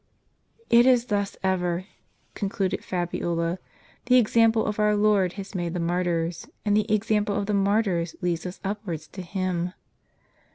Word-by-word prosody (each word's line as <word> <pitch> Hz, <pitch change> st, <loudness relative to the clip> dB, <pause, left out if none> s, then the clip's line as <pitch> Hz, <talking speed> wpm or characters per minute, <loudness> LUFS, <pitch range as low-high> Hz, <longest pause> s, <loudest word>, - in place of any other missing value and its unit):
"It 235 Hz, +2 st, +7 dB
is 245 Hz, -2 st, +4 dB
thus 200 Hz, -1 st, -1 dB
ever," 180 Hz, -1 st, 0 dB, 0.5 s
concluded 195 Hz, -2 st, -2 dB
Fabiola. 175 Hz, -1 st, -2 dB, 0.5 s
"The 250 Hz, 0 st, +6 dB
examjDle 225 Hz, -1 st, +3 dB
of 210 Hz, 0 st, -2 dB
our 210 Hz, 0 st, +3 dB
Lord 205 Hz, -3 st, +3 dB
has 200 Hz, 0 st, -8 dB
made 175 Hz, -2 st, -3 dB
the -, -, -1 dB
martyrs; 170 Hz, -1 st, -1 dB, 0.2 s
and 205 Hz, -1 st, +3 dB
the 215 Hz, +1 st, +1 dB
example 210 Hz, -1 st, +1 dB
of 205 Hz, 0 st, -1 dB
the 210 Hz, -, -1 dB
martyrs 195 Hz, -4 st, +1 dB
leads 175 Hz, -1 st, -1 dB
us 180 Hz, -, -8 dB
upwards 190 Hz, -6 st, -4 dB
to 190 Hz, -, -8 dB
Him. 180 Hz, -1 st, -2 dB
195 Hz, 150 wpm, -25 LUFS, 175-210 Hz, 0.5 s, It